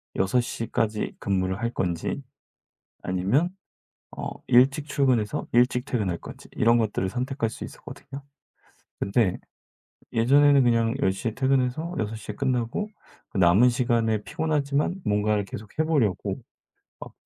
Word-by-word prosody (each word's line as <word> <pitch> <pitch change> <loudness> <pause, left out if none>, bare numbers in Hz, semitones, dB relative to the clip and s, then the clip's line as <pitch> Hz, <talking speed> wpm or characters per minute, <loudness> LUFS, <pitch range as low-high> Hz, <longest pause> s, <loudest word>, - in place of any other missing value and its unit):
6:00 115 +3 0
까지 110 -2 -1
근무를 95 -1 -1
할 115 0 -1
건지 90 +9 -2 0.8
아니면 100 - +1 0.6
어, - - -5 0.2
일찍 135 +4 +4
출근해서 130 -7 +1
일찍 125 +1 +3
퇴근할 105 -10 -1
건지 - - -11
이런 115 +1 +3
것들을 105 -4 0
선택할 125 +1 -2
수 - - -8
있었거든요. 140 +1 -10 0.8
근데 100 -2 +1 0.8
예전에는 140 +4 +5
그냥 115 -1 +2
10:00 95 +5 0
에 110 - -5
퇴근해서 135 +5 0
6:00 110 0 -4
에 - - -12
끝나고 130 - -1 0.4
그 - - -4
남은 95 +7 +6
시간에 115 -3 +1
피곤하지만 150 - -1
뭔가를 105 -1 +1
계속 100 +4 -10
해 160 - +3
보려고 135 - 0 0.6
막 - - -9
115 Hz, 270 characters per minute, -25 LUFS, 105-135 Hz, 0.8 s, 남은